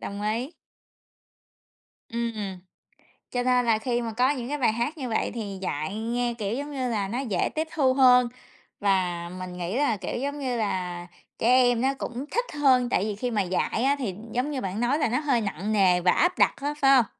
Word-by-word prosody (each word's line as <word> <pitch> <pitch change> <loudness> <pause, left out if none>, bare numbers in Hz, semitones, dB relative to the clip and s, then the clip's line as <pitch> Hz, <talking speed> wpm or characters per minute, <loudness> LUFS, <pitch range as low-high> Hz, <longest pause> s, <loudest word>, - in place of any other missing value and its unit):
Đồng 200 +1 -6
ý. 230 +8 -2 1.5
Ừm. 225 -6 -3 0.7
Cho 245 0 -1
nên 250 -1 +3
là 225 -2 +3
khi 240 +1 -1
mà 225 -2 -4
có 250 +4 +3
những 255 -3 -2
cái 295 - -1
bài 245 -5 +3
hát 240 +8 -2
như 260 -4 -4
vậy 220 - 0
thì 205 -5 -5
dạy 155 +2 -3
nghe, 240 +2 -1
kiểu, 210 +1 -2
giống 290 +3 -5
như 260 -3 -2
là 205 -4 -1
nó 235 +5 -3
dễ 220 -10 0
tiếp 315 +1 -1
thu 265 -4 +3
hơn 250 -2 +6 0.5
và 180 -4 0
mình 180 -1 -6
nghĩ 180 +7 -3
là, 280 -7 +2
kiểu, 200 - -4
giống 285 +1 -3
như 260 -3 -2
là, 180 -4 -2 0.3
trẻ 230 - 0
em 245 -2 +4
nó 270 +1 +2
cũng 250 +3 -5
thích 485 +1 0
hơn, 260 -4 +3
tại 195 - +1
vì 210 -1 -2
khi 245 +4 -3
mà 210 -2 +1
dạy 185 +5 -1
á 275 +2 +3
thì 210 -9 -3 0.2
giống 255 +5 -1
như 270 - -3
bạn 195 +3 -3
nói 250 +5 +1
là 260 - +1
nó 250 - +1
hơi 275 -6 +1
nặng 205 0 -3
nề 185 -4 +4
và 180 - +4
áp 350 - +2
đặt - - +4
á, 290 +1 -1
phải 270 0 +6
hông? 245 - +5
235 Hz, 220 wpm, -26 LUFS, 200-260 Hz, 1.5 s, hơn